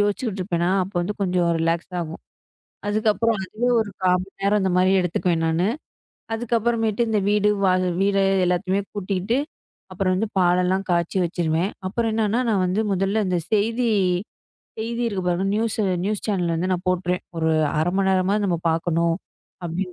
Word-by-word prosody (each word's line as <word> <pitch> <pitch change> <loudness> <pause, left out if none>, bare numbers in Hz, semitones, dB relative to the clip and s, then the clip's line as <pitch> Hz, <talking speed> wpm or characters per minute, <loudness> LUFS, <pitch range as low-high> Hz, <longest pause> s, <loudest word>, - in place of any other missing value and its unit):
யோசிச்சுக்கிட்டு 205 0 -1
இருப்பேன்னா 175 -2 0
அப்ப 190 +2 -6
வந்து 180 +4 -2
கொஞ்சம் 180 -2 +1
ரிலாக்ஸ் 165 +2 -1
ஆகும். 165 -1 -6 0.7
அதுக்கப்புறம் 215 +1 +1
அதுவே 225 +6 -2
ஒரு 215 - -4
காமன் 185 +1 +1
நேரம் 205 +1 +2
இந்த 190 -1 +1
மாரி 185 +1 +4
எடுத்தூக்குவேன் 175 -1 0
நானு 165 +3 +1 0.7
அதுக்கப்புறமேட்டு 230 -1 0
இந்த 220 -1 +1
வீடு 210 0 +3 0.2
வாக 185 -1 +2
வீர 200 0 +2 0.3
எல்லதையுமே 185 +2 +1
பூட்டிக்கிட்டு 200 +2 -1 0.6
அப்பறம் 185 0 0
எல்லாம் 215 +3 -2
பால் 180 0 +4
எல்லாம் 190 +2 0
காச்சி 170 +1 0
வாச்சுறுவேன் 170 +1 0 0.2
அப்பறம் 225 +4 -1
என்னான 220 +2 +1
நான் 200 -4 +2
வந்து 185 +4 0
முதல்ல 195 -1 +1
செய்தி 225 +4 +1 0.9
செய்தி 230 +2 -3
இருக்கு 200 -4 -2
பாருங்களேன் 185 +3 0
நியூஸ் 225 0 0
ஆ - - +1 0.2
நியூஸ் 210 0 -2
சேனல் 185 -5 0
இருந்து 170 +3 -1
நான் 180 -1 -2
போடுறான் 170 -3 0
ஒரு 160 +3 +2
மண்நேரமாது 190 0 +2
பாக்கணும் 165 0 +1 0.5
அப்புடினு 180 +2 -3
190 Hz, 150 wpm, -23 LUFS, 175-210 Hz, 0.9 s, மாரி